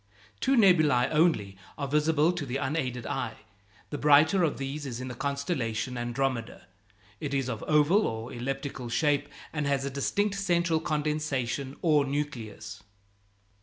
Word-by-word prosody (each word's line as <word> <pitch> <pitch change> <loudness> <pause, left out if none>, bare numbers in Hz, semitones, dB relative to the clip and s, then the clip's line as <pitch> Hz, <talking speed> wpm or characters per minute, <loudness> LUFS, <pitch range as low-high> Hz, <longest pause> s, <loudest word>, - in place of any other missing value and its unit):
Two 270 0 +2
nebulæ 155 - +5
only 150 - +2 0.2
are 140 - -3
visible 150 +3 +3
to 175 -3 -4
the 135 -1 -3
unaided 130 -4 -2
eye. - - -3 0.6
The 145 - -3
brighter 150 +6 +5
of 160 -4 +1
these 140 +2 -4
is 120 -2 -5
in 130 0 -5
the - - -5
constellation 130 -4 -2
Andromeda; 120 -3 -2 0.5
it 140 -1 -3
is 135 -2 0
of 115 -4 -4
oval 155 +7 +4
or 110 +3 -5
elliptical 135 0 -4
shape, 145 +3 +1 0.2
and 150 -2 -1
has 140 -1 0
a 140 - -3
distinct 200 +9 0
central 170 -4 +2
condensation 145 -4 -2
or 150 -4 +4
nucleus. 135 -6 -5
140 Hz, 145 wpm, -28 LUFS, 125-155 Hz, 0.6 s, nebulæ